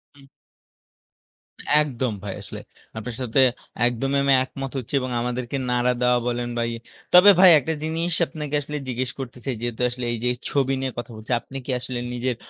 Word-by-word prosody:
হুম। 140 -1 -17 1.6
একদম 130 -4 -1
ভাই 100 -2 -4
আসলে। - - -8 0.4
আপনার 115 +2 -5
সাথে 125 +1 0 0.5
একদমই 135 +3 -1
আমি 140 0 +4
একমত 135 0 -6
হচ্ছি 125 0 -6
এবং 130 0 -4
আমাদেরকে 125 +2 -3
নাড়া 125 0 +2
দেওয়া 125 0 +4
বলেন 120 0 -1
ভাই। 115 0 0 0.4
তবে 180 +3 +9
ভাই 185 -1 +9
একটা 155 +4 -2
জিনিস 165 +2 -1
আপনাকে 150 -2 -5
আসলে 150 +1 -5
জিজ্ঞেস 125 0 -2
করতে 130 -2 -6
চাই, 135 -3 -1
যেহেতু 120 0 -4
আসলে 125 0 -5
এই - - -2
যে 125 - +2 0.2
ছবি 135 -1 +1
নিয়ে 135 0 -2
কথা 120 0 -5
বলছি। 110 +3 -9
আপনি 135 - -9
কি - - -3
আসলে 125 0 -5
নিজের 125 +1 -1
125 Hz, 180 wpm, -24 LUFS, 120-135 Hz, 1.6 s, তবে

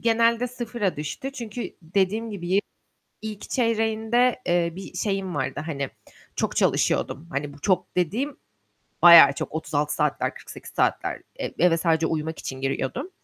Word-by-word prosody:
genelde 230 +1 +3
0'a 235 -5 -3
düştü 155 - -5
çünkü 235 -2 -6
dediğim 200 +6 0
gibi 190 -1 0 0.6
ilk 215 -2 -7
çeyreğinde, 230 +1 +1
eee, 175 -1 +2
bir 195 - -9
şeyim 195 -3 -2
vardı. - - -2
Hani, 140 -4 -3 0.5
çok - - -1
çalışıyordum. 155 +5 +1
Hani, 145 +1 -3
bu 145 - -16
çok 180 +2 0
dediğim 230 - -1 0.7
bayağı 170 -5 +10
çok - - -5
36 150 -1 -1
saatler, 150 -2 0
48 - - -11
saatler. - - 0 0.2
E - - -2
eve 170 -1 +4
sadece 160 -1 +2
uyumak 160 0 -3
için 130 0 -6
giriyordum. 135 - -2
185 Hz, 140 wpm, -25 LUFS, 160-230 Hz, 0.7 s, bayağı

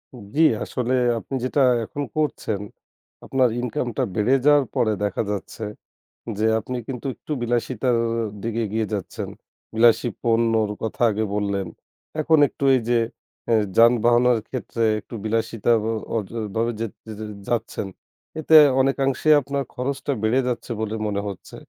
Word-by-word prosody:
উম 115 -5 -11
জী, 160 - +5 0.2
আসলে 125 0 -2 0.3
আপনি 135 - -6
যেটা 130 +3 +1 0.2
এখন 145 +6 -5
করছেন 125 -9 -1 0.6
আপনার 130 -2 +2
ইনকামটা 125 +1 -2
বেড়ে 110 +5 +2
যাওয়ার 145 -2 +5
পরে 110 -2 +2
দেখা 105 +2 0
যাচ্ছে 105 +2 -5 0.7
যে 110 - +1
আপনি 125 +3 -5
কিন্তু 130 -1 -6
একটু - - -11
বিলাসিতার 120 +1 0 0.5
দিকে 115 0 -2
এগিয়ে 110 +1 -1
যাচ্ছেন। 100 -4 -4 0.5
বিলাসী 115 +1 +4
পণ্যর 115 -2 +2
কথা 110 - -4
আগে 110 +1 -1
বললেন। 100 -2 -1 0.5
এখন 160 +1 +4
একটু - - -8
এই 125 - +1
যে 120 -1 +4 0.5
এ - - +5 0.2
যানবাহনের 120 +1 +5
ক্ষেত্রে 120 -2 -3 0.2
একটু 110 - -10
বিলাসিতা 115 +1 0 0.4
অ - - +3
ভ - - -16 0.2
ভাবে 115 +1 +1
য - - -4 0.7
যাচ্ছেন। 115 -4 -2 0.5
এতে 160 0 +4 0.3
অনেকাংশে 135 +2 +1
আপনার 140 0 -2
খরচটা 135 +2 -2
বেড়ে 115 +4 +3
যাচ্ছে 125 0 -3
বলে 110 0 -2
মনে 100 -1 -1
হচ্ছে। 100 -2 -8
120 Hz, 140 wpm, -23 LUFS, 110-130 Hz, 0.7 s, জী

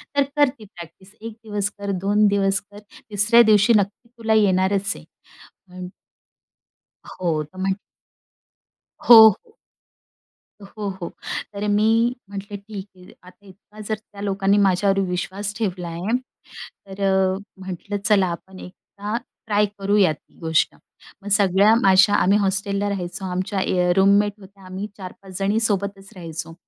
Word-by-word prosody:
तर 285 - +4
कर 290 -2 +4
ती 215 - -12
प्रॅक्टिस 190 0 -14
1 225 0 -7
दिवस 205 -2 -2
कर, 200 0 -3
2 205 +2 +2
दिवस 195 -1 +1
कर, 205 0 -15 0.3
तिसऱ्या 210 +4 +5
दिवशी 210 +3 +5
नक्की 205 +4 -3
तुला 225 -1 0
येणारच 195 -1 +2
आहे. - - -12 0.6
म्हण 180 0 -9 1.2
हो. 165 -4 -2
तर 150 +5 -17
म्हण 190 0 0 1.3
हो, 225 -2 +10
हो. 435 - -8 1.1
हो, 205 +1 -6
हो. 190 -3 -6 0.4
तर 205 +1 -4
मी 210 +1 +2 0.4
म्हटलं 200 +1 -7
ठीक 200 -1 -9
आहे. 180 0 -16
आता 180 +2 -18
इतका 205 +3 -18
जर 215 - -1
त्या 210 -2 -15
लोकांनी 200 0 +1
माझ्यावर 195 0 +2
विश्वास 190 +3 -4
ठेवला 185 -6 -3
आहे. 175 +8 -2 0.7
तर 195 +1 -9
अ, 190 -1 +2 0.3
म्हटलं 190 +2 -5
चला 200 -3 +3
आपण 185 +2 -9
एकदा 205 +3 -8 0.3
ट्राय 210 -1 +2
करूया 200 -3 +3
ती 150 - -22
गोष्ट. 160 -2 0 0.5
मग 205 - -6
सगळ्या 200 +1 +4
माझ्या 195 +1 +5
आम्ही 200 0 +3
हॉस्टेलला 200 0 -1
राहायचो, 185 -1 -5
आमच्या 185 +2 -2
ए 185 - -1
अ, - - +4
रूममेट 200 +2 +3
होत्या. 195 0 -17
आम्ही 190 +3 -6
4-5 190 -1 -10
जणी 200 +3 +1
सोबतच 200 -2 -2
राहायचो. 165 -2 -7
200 Hz, 145 wpm, -22 LUFS, 185-205 Hz, 1.3 s, हो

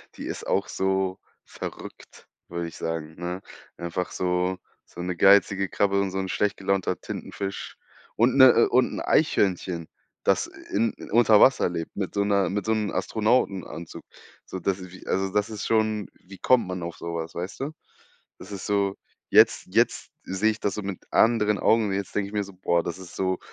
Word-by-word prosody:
Die - - -7
ist - - -6
auch - - +1
so 95 0 0 0.2
verrückt, - - -10 0.2
würde 85 0 -4
ich 85 - -10
sagen, 80 -1 -4
ne? 90 +2 -5 0.4
Einfach 85 +1 -3
so 90 0 0 0.3
so - - -10
'ne 90 0 -2
geizige 100 +1 +5
Krabbe 100 -1 +1
und 100 -1 -1
so 95 - -4
'n 95 -1 -3
schlecht 105 +1 0
gelaunter 95 -1 0
Tintenfisch 100 -1 -6 0.4
und 120 +4 +3
'ne 130 - +10
äh, 115 - +4
und 125 +1 +3
'n - - -4
Eichhörnchen, 90 - +1 0.3
das, - - +2
äh, - - -14
in 110 +1 +2 0.2
unter 110 -1 +6
Wasser 135 - +5
lebt 85 -2 -5
mit 95 -2 -3
so 100 - +1
'ner 100 -2 +2
mit 100 +1 -2
so 110 - +2
'nem 105 -2 -1
Astronautenanzug. 95 -4 -1 0.4
So, 95 - -6
das 95 +2 -1
ist 90 -1 -10
wie 95 - -13
also, 95 +1 0
das 105 +1 +1
ist 110 -1 -5
schon 110 -2 +1
wie 95 +1 -15
kommt 125 +3 +3
man 90 -1 -4
auf 85 0 -5
so 85 0 -5
was, 80 0 -5
weißt 90 +3 -5
du? 140 +3 -2 0.7
Das - - -11
ist 95 - -6
so 100 -1 +1 0.3
jetzt - - +5
jetzt - - +2
sehe 95 +4 +1
ich 110 - -7
das 100 - -1
so 105 - -4
mit 95 -2 -5
anderen 105 -3 +3
Augen 110 +2 +3
und 100 - -2
jetzt 100 -1 -4
denke 100 -1 0
ich - - -14
mir 105 -1 0
so: 100 - -12
„Boah, 85 -2 +1
das 85 - -4
ist 90 -2 -11
so 95 -1 0
95 Hz, 200 wpm, -25 LUFS, 90-105 Hz, 0.7 s, ne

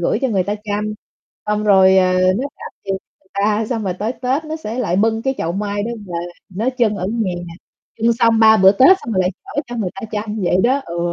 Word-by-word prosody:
gửi 175 - +1
cho 265 - +2
người 195 -5 +1
ta 205 - -2
chăm, 210 +1 -2 0.5
xong 210 0 0
rồi, 190 -2 +6
ờ, 185 0 +3 0.3
nó 265 - -2
trả - - -11 0.2
tiền 195 -1 -1
cho - - -48
người 190 - -33
ta, 210 +2 +1
xong 225 -4 -2
rồi 185 -2 -2
tới 215 +5 -3
Tết 265 +5 -2
nó 310 +1 -4
sẽ 240 -6 -6
lại 185 -7 0
bưng 225 +2 +1
cái 265 +1 0
chậu 165 - -2
mai 205 +1 -2
đó 225 - -3 0.2
về, 175 - -8 0.4
nó 210 +7 -2
trưng 215 -3 +2
ở 185 -1 -3
nhà, 220 -6 -1 0.7
trưng 230 +1 +3
xong 230 -1 +3
3 220 0 +7
bữa 190 -1 +6
tết 270 - +6
xong 230 - -5
rồi 190 - +2
lại 180 - +1
chở 290 - -3
cho 240 0 -6
người 195 -5 -2
ta 195 - -9
chăm 210 0 -3
vậy 175 - +2
đó, 265 +4 +3
ừ. 170 0 -5
210 Hz, 255 wpm, -18 LUFS, 190-230 Hz, 0.7 s, 3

